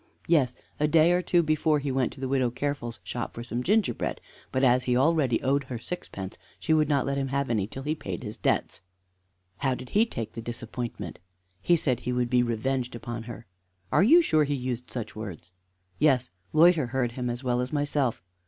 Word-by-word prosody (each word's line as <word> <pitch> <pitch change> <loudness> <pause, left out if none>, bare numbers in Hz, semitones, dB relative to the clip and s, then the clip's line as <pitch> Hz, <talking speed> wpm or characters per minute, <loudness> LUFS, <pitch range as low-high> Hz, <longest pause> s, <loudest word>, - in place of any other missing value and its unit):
"Yes; 140 -7 +3 0.2
a 150 - +3
day 160 +2 +5
or 180 0 +3
two 175 -1 +3
before 155 0 +2
he 140 -1 -2
went 130 -2 +1
to - - -14
the 135 - -2
Widow 130 -2 +2
Careful's 125 -2 -3
shop 120 - -5
for 120 - -5
some 120 +1 -3
gingerbread; 205 - +1 0.3
but 130 +1 0
as 125 0 +4
he 125 -1 +2
already 135 -4 +3
owed 140 +1 +1
her 130 -2 -5
sixpence, 110 - -6 0.2
she 160 - +1
would 155 -1 +3
not 140 -3 +2
let 140 0 -1
him 135 - -1
have 140 -1 -1
any 105 -4 +1
till 135 +4 -7
he 150 - -1
had 155 - -3
paid 90 -3 -5
his - - -5
debts." - - -1 0.8
"How 135 -2 0
did 125 0 -9
he 220 +3 +3
take 115 - -5
the 115 - -6
disappointment?" 120 -6 -6 0.4
"He 175 - +4
said 130 -7 +1
he 125 - -3
would 125 -1 0
be 125 -1 +5
revenged 120 +1 -1
on 120 -1 -4
her." 115 0 -8 0.5
"Are 150 - +4
you 330 - +7
sure 155 - +3
he 145 0 0
used 125 -2 -4
such 110 -4 -5
words?" 95 -5 -7 0.5
"Yes. 130 -7 +3 0.2
Loiter 160 -3 +5
heard 120 0 -1
him 125 0 -3
as 120 +2 -4
well 125 -1 +1
as 125 - -3
myself." 145 -7 0
130 Hz, 210 wpm, -27 LUFS, 120-150 Hz, 0.8 s, you